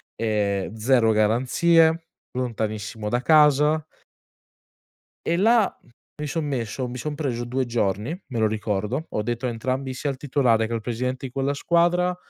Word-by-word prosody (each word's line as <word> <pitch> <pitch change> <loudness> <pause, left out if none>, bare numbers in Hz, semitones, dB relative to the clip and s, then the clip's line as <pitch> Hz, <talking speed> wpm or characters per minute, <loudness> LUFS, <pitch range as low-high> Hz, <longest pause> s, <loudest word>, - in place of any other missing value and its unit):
ehm, 105 -2 -1
zero 115 0 +3
garanzie 160 +10 +3 0.2
lontanissimo 110 -3 -3
da 120 +3 0
casa. 150 0 +4 1.4
E 170 - +1
là, 220 +3 +4 0.5
mi 150 - -2
son 155 +2 -2
messo 130 -2 -3
mi 125 +1 -6
son 150 +4 -4
preso 130 -5 -2
2 130 +2 -1
giorni, 115 - -1
me 120 -5 -4
lo 110 - +3
ricordo. 105 +6 -2
Ho - - -2
detto 120 +3 -3
a - - +1
entrambi, 130 +3 -3
sia 135 +3 -3
al 135 - -4
titolare 125 -5 +2
che 115 - -4
al 115 - -2
presidente 125 +3 -3
di 130 - -6
quella 135 +2 -1
squadra 175 +4 +2
125 Hz, 155 wpm, -24 LUFS, 110-150 Hz, 1.4 s, casa